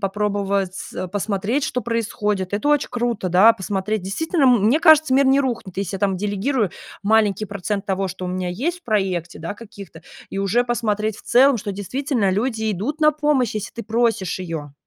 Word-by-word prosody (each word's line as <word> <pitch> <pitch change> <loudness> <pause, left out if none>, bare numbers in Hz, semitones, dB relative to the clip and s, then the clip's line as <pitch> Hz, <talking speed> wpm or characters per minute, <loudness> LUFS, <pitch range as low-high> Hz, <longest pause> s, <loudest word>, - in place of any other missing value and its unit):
попробовать, 200 -1 -1 0.2
а, 185 - -3
посмотреть, 205 +7 -1
что 250 - -1
происходит. 210 -4 -2
Это 210 +8 -1
очень 295 -1 +2
круто, 240 -5 -1
да, 190 +6 +6
посмотреть. 200 +1 -3
Действительно, 295 - -1
м 245 -6 +4
мне 290 +8 +3
кажется, 315 -4 +6
мир 275 +1 +4
не 265 +1 +4
рухнет. 235 -8 -2
Если 195 -1 -3
я 195 - -5
там 195 -2 +1
делегирую 205 +3 -1 0.3
маленький 215 -1 +2
процент 200 0 -4
того, 195 0 -1
что 185 0 -7
у - - -3
меня 180 0 -3
есть 320 - -2
в - - -51
проекте, 190 -6 -1
да, 170 +5 -5
каких-то, 200 -7 -12 0.3
и - - -5
уже 200 +5 +1
посмотреть 215 -3 -1
в - - -14
целом, 260 +2 +5
что 205 -1 -4
действительно 210 +2 -1
люди 220 +1 -1
идут 260 - -4
на 305 0 +5
помощь, 295 -6 +1
если 215 0 -4
ты 230 - -4
просишь 225 -5 0
ее. 160 -5 -6
210 Hz, 190 wpm, -21 LUFS, 195-245 Hz, 0.3 s, да